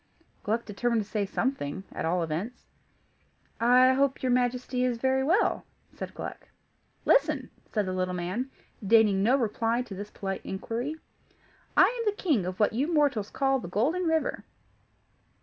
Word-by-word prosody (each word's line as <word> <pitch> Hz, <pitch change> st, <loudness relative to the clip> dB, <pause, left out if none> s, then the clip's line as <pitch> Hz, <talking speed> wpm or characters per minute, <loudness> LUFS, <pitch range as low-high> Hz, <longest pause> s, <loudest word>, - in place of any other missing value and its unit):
Gluck 225 Hz, +3 st, -1 dB
determined 225 Hz, +2 st, 0 dB
to -, -, -16 dB
say 210 Hz, -2 st, -1 dB
something 190 Hz, -, -2 dB
at -, -, -4 dB
all 170 Hz, +1 st, +1 dB
events. 170 Hz, +10 st, -4 dB, 0.9 s
"I 250 Hz, +2 st, +6 dB
hope 270 Hz, 0 st, +1 dB
your 255 Hz, -, +2 dB
Majesty 250 Hz, 0 st, 0 dB
is 250 Hz, -2 st, +1 dB
very 265 Hz, +2 st, +1 dB
well," 345 Hz, +10 st, +2 dB, 0.3 s
said -, -, -7 dB
Gluck. -, -, -7 dB, 0.6 s
"Listen!" -, -, +2 dB, 0.2 s
said 210 Hz, -2 st, 0 dB
the 185 Hz, -, -3 dB
little 185 Hz, 0 st, -1 dB
man, 185 Hz, +9 st, -3 dB, 0.3 s
deigning 210 Hz, -2 st, +4 dB
no 235 Hz, +6 st, +4 dB
reply 230 Hz, 0 st, 0 dB
to 230 Hz, -, -9 dB
this 205 Hz, +2 st, -6 dB
polite 195 Hz, -2 st, -4 dB
inquiry. 235 Hz, +9 st, -4 dB, 0.8 s
"I -, -, +9 dB
am 470 Hz, -1 st, +1 dB
the 415 Hz, -, -15 dB
King 260 Hz, -, +1 dB
of 185 Hz, 0 st, -5 dB
what 210 Hz, -, +3 dB
you 275 Hz, +9 st, 0 dB
mortals 285 Hz, -10 st, +2 dB
call 270 Hz, 0 st, +1 dB
the 240 Hz, -, -7 dB
Golden 290 Hz, -, +1 dB
River. 320 Hz, -1 st, 0 dB
235 Hz, 160 wpm, -28 LUFS, 200-265 Hz, 0.9 s, I